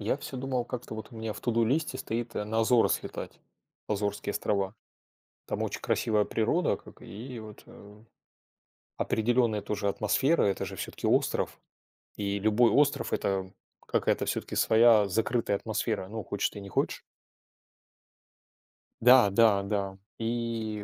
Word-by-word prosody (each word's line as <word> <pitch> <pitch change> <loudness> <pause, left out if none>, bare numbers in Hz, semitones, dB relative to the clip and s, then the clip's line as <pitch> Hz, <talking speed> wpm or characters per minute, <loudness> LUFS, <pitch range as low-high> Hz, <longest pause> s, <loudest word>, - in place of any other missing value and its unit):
Я 105 +6 0
всё 135 - -7
думал, 130 -1 -2
как-то 120 -2 -6
вот 110 +2 -8
у 115 - -10
меня 110 -1 -3
в - - -10
"To 120 - -1
do" 115 0 +3
листе 135 +2 0
стоит 120 +1 -4
на 105 +2 -1
Азоры 115 +1 +4
слетать. - - -4 0.5
Азорские 100 0 -2
острова. 100 -2 -1 0.7
Там - - -2
очень - - -3
красивая 105 -2 +1
природа, 120 +11 +1
как - - -16
и 120 +4 -8
вот 110 -1 -11
э 105 +2 -15 0.9
Определённая 115 -2 +1
тоже 105 0 -2
атмосфера. 130 +10 +2
Это 100 -1 0
же - - -7
всё-таки - - -4
остров. - - +1 0.6
И 100 0 -2
любой 110 +3 +4
остров- 145 0 +2
это 95 -1 -1 0.4
какая-то - - +1
всё-таки - - -3
своя 110 -2 +5
закрытая 110 +1 0
атмосфера. 110 -2 -2
Ну, 110 +1 -5
хочешь 100 +1 -1
ты, 105 - -9
не 100 -1 -9
хочешь. - - -1 2.0
Да-да-да. 100 -4 +4 0.2
И 115 -2 -2
110 Hz, 140 wpm, -29 LUFS, 100-120 Hz, 2.0 s, своя